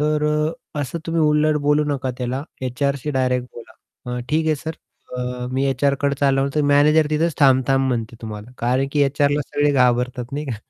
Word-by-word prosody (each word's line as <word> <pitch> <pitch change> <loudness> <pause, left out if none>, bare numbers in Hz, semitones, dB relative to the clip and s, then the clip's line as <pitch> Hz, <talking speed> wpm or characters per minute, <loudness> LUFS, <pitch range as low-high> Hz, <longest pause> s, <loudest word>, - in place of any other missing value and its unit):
तर 150 0 +1
अ, 150 +1 +1 0.3
असं 145 +4 -4
तुम्ही 165 0 0
उलट 150 0 +3
बोलू 150 +1 +3
नका 140 -3 -2
त्याला 125 +2 -2 0.3
एचआरशी 140 +3 -2
डायरेक्ट 125 -2 0
बोला 120 - -11 0.4
अ, - - -2
"ठीक 160 +1 +1
आहे 155 - +3
सर 160 +3 -5 0.4
अ, 125 0 -4
मी 135 +1 0
एचआरकडे 140 +1 +1
चालवतो," 140 +1 +2
मॅनेजर 150 +2 +4
तिथेच 160 +1 +1
थांब-थांब 135 0 +4
म्हणते 115 -2 -3
तुम्हाला. 105 +1 -7
कारण 130 +3 +1
की 145 -1 +3
एचआरला 145 +1 +2
सगळे 145 0 +1
घाबरतात 125 -1 +1
नाही 145 +2 -3
का. 120 -5 -3
140 Hz, 175 wpm, -21 LUFS, 125-150 Hz, 0.4 s, मॅनेजर